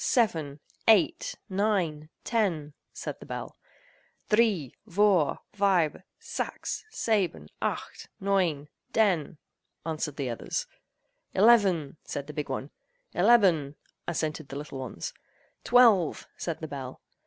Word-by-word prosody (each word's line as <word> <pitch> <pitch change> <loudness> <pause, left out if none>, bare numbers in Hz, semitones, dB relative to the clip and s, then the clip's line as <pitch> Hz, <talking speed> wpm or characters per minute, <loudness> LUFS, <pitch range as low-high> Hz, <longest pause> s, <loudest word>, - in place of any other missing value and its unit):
Seven! 160 - +1 0.3
Eight! 215 -6 +4
Nine! 185 -7 0
Ten!" 175 -10 0 0.2
said - - -6
the - - -11
bell. - - -6 0.8
"Dree! 210 - +3
Vour! 190 -6 +3
Fibe! 190 -7 +2 0.2
Sax! 455 - -4
Seben! 190 - 0
Aight! - - -3
Noin! 180 -7 +1 0.3
Den!" 180 -8 +2 0.5
answered 155 -3 -2
the 130 -4 -2
others. 115 - -3 0.7
"Eleven!" 190 -9 +4
said 140 - -5
the 150 - -8
big 150 -2 -4
one. 135 +2 -4 0.4
"Eleben!" 175 -8 +4 0.3
assented 155 -3 -2
the - - -7
little 145 -2 -6
ones. 125 -10 -5 0.5
"Twelve!" 225 -9 +5
said 170 -2 -4
the 160 - -4
bell. 135 -3 -7
165 Hz, 110 wpm, -28 LUFS, 150-205 Hz, 0.8 s, Twelve